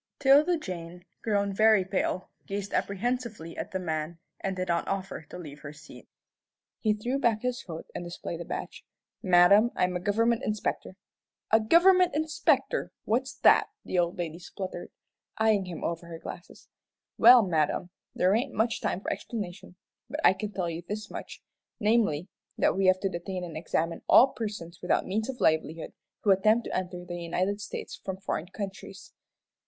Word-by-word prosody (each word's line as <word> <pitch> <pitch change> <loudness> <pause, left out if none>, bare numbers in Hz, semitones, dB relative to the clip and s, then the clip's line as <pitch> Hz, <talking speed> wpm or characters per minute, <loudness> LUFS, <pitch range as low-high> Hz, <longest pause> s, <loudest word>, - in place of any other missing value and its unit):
'Tilda 290 +5 +5
Jane, 180 - -7 0.2
grown 200 -2 0
very 215 -1 +5
pale, 185 -1 -2 0.2
gazed 200 0 -4
apprehensively 215 -4 -2
at - - -5
the 190 - -3
man, 160 -2 -3 0.2
and 195 -1 -2
did 185 0 -3
not 170 -1 0
offer 195 -2 -3
to - - -8
leave 150 -4 -9
her 145 - -8
seat. 150 +1 -14 0.7
He 215 -2 +2
threw 245 +6 -2
back 230 -4 +1
his 250 -1 -1
coat 165 -3 -8
and - - -5
displayed 175 -1 -6
a - - -3
badge. - - -6 0.4
"Madam, 185 +5 +6
I'm 180 0 +1
a - - 0
government 225 +5 +1
inspector." 210 -2 -2 0.6
"A 220 - +6
government 360 +9 +5
inspector! 315 +10 +1
What's 255 +4 0
that?" - - +6 0.2
the 180 - 0
old 175 +1 0
lady 170 -1 -4
spluttered, 185 0 -7 0.5
eyeing 220 -3 +3
him 180 -2 -7
over 170 0 -3
her 165 -1 -7
glasses. 175 - -10 0.5
"Well, 240 0 +9
madam, 170 0 0 0.2
there 185 +2 +3
ain't 250 +4 0
much 225 +2 0
time 185 - -1
for - - -1
explanation, 185 -5 -7 0.3
but 295 +5 -4
I - - +7
can 205 +2 -5
tell 185 -3 -2
you 165 0 -4
this 210 +4 -6
much, - - -8 0.4
namely, 210 -7 +2 0.3
that - - +2
we 190 0 +2
have 185 0 +5
to 195 - 0
detain 180 +1 -5
and 170 -3 -7
examine 165 +1 -2
all 265 - +8
persons 205 -9 -6
without 180 - +1
means 220 +5 -2
of 260 -2 -5
livelihood 160 0 0 0.3
who 205 - +4
attempt 215 +4 +3
to - - -4
enter 180 -1 -4
the 175 -1 -6
United 185 +4 -1
States - - -7
from 190 -1 -4
foreign 185 -3 -3
countries." 195 0 -8
190 Hz, 170 wpm, -28 LUFS, 175-220 Hz, 0.7 s, Well